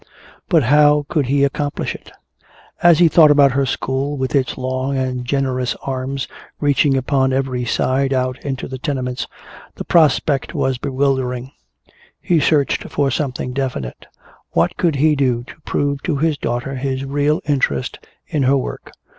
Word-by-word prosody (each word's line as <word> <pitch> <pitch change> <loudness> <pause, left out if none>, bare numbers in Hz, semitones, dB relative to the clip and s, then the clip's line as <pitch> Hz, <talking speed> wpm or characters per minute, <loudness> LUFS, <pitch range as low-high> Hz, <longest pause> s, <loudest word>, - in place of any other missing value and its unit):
But 165 -5 +4
how 145 +3 +4
could 150 -6 0
he 140 +1 +2
accomplish 145 +1 -1
it? - - -12 0.7
As 170 -2 +6
he 170 0 +6
thought 160 -1 +6
about 145 -2 +5
her 135 +1 0
school, 135 +3 -2
with 130 -1 -2
its 135 -3 0
long 130 +1 -2
and 130 -1 -2
generous 130 -1 -1
arms 135 0 -3 0.3
reaching 145 -1 +2
upon 130 0 +1
every 130 -2 -1
side 135 +3 0
out 130 -1 -1
into 135 -3 -4
the 130 -1 -7
tenements, 130 -3 -3 0.5
the - - -5
prospect 150 -3 +2
was 130 -2 0
bewildering. 130 -2 -1 0.7
He 170 -2 +1
searched 145 -1 +1
for 140 -2 0
something 130 -2 -3
definite. 125 - -4 0.5
What 85 +1 +1
could 170 -4 +1
he 150 +2 +3
do 125 -4 0
to 155 - -14
prove 140 -1 -1
to 165 - -1
his 155 +1 +1
daughter 120 +1 -3
his 135 0 -2
real 145 +3 +1
interest 135 - -1 0.3
in 150 - -2
her 135 +1 +3
work? 130 - -6
135 Hz, 155 wpm, -19 LUFS, 130-145 Hz, 0.7 s, As